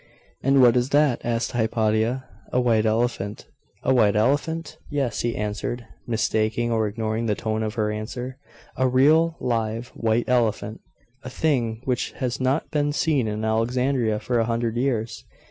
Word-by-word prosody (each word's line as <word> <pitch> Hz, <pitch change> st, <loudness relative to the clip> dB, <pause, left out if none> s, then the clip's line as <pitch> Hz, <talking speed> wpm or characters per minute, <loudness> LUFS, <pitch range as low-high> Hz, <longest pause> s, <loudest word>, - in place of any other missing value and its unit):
'And 135 Hz, 0 st, +4 dB
what 120 Hz, -1 st, +6 dB
is 125 Hz, +1 st, +1 dB
that?' 145 Hz, -3 st, +3 dB
asked 115 Hz, 0 st, -1 dB
Hypatia. 110 Hz, +2 st, 0 dB, 0.3 s
'A 125 Hz, -, +2 dB
white 115 Hz, -3 st, +2 dB
elephant.' 110 Hz, -2 st, -1 dB, 0.4 s
'A 130 Hz, -, +3 dB
white 110 Hz, -5 st, +4 dB
elephant?' 145 Hz, +9 st, 0 dB
'Yes,' 140 Hz, -5 st, -1 dB
he 120 Hz, -1 st, -1 dB
answered, 105 Hz, +3 st, -3 dB, 0.2 s
mistaking 110 Hz, +1 st, 0 dB
or 110 Hz, -2 st, +1 dB
ignoring 110 Hz, +2 st, -2 dB
the 105 Hz, -, +1 dB
tone 110 Hz, 0 st, -2 dB
of 110 Hz, 0 st, -3 dB
her 105 Hz, -2 st, 0 dB
answer. 125 Hz, +5 st, -5 dB, 0.4 s
'A 130 Hz, -, +3 dB
real, 155 Hz, +6 st, +4 dB
live, 115 Hz, 0 st, -2 dB
white 115 Hz, 0 st, 0 dB
elephant; 110 Hz, -3 st, 0 dB, 0.4 s
a 130 Hz, -, -6 dB
thing 125 Hz, -6 st, 0 dB
which 125 Hz, -2 st, -1 dB
has 125 Hz, 0 st, -3 dB
not 130 Hz, +4 st, 0 dB
been 145 Hz, -1 st, +1 dB
seen 145 Hz, -6 st, +1 dB
in 105 Hz, +1 st, -3 dB
Alexandria 115 Hz, 0 st, +1 dB
for 120 Hz, +3 st, 0 dB
a 115 Hz, -, +2 dB
hundred 115 Hz, 0 st, -1 dB
years! 120 Hz, -3 st, -1 dB
120 Hz, 160 wpm, -24 LUFS, 110-130 Hz, 0.4 s, what